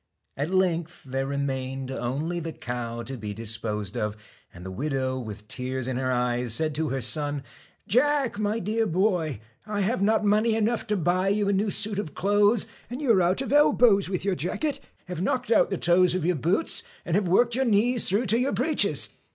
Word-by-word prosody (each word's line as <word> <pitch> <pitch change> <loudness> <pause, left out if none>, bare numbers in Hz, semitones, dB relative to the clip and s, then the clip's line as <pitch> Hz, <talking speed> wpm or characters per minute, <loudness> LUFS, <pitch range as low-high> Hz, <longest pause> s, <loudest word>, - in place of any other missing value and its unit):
At 145 +4 -2
length 175 -3 0
there 135 +1 -2
remained 135 -1 -3
only 140 +8 -2
the 165 -1 -5
cow 120 -2 -5
to 135 +3 -5
be 105 -4 -6
dis 115 0 -1
posed 105 -3 -4
of, 105 0 -2 0.3
and 90 +1 -12
the 95 - -5
widow, 130 +2 -2
with 105 -3 -8
tears 130 +1 -3
in 130 -1 -2
her 130 0 0
eyes. 125 0 0
TACK 115 - +1
said 155 -1 0
to 155 +1 -1
her 135 -1 -2
son: 145 +3 +1 0.4
'Jack, 265 -2 +2
my 210 +1 0
dear 220 +2 0
boy, 170 - 0 0.3
I 205 -1 -1
have 200 +2 0
not 215 +2 +3
BEAN^ - - +1
mone 210 +1 +4
y - - +2
enough 225 +1 0
to 210 -1 0
buy 180 +2 +1
you 200 0 +1
a - - +2
new 205 +2 +1
suit 205 0 -2
of 160 -7 -5
clothes, 205 +2 +3
STALK 225 - -21 0.2
anc 250 - -4
^ - - -6
y - - -4
u 255 - +3
are 190 - +4
out 180 +2 +2
^ 270 - -3
e - - -6
lb 295 +2 +4
ws 200 -6 +4
with 185 -1 -3
y 200 - +2
ur - - 0
jacket, 275 - -2 0.3
have 180 -2 -5
knocked 235 +5 -1
out - - +4
the 195 - -2
toes 175 +1 +3
of 185 - -1
your 180 0 +2
boots, 170 - +1 0.2
and 185 +3 +1
worked 235 +7 +3
your 265 +2 +1
knees 230 +2 +2
through 205 +6 +1
your 250 +5 +2
breeches. 310 -1 +1
175 Hz, 230 wpm, -26 LUFS, 130-210 Hz, 0.4 s, mone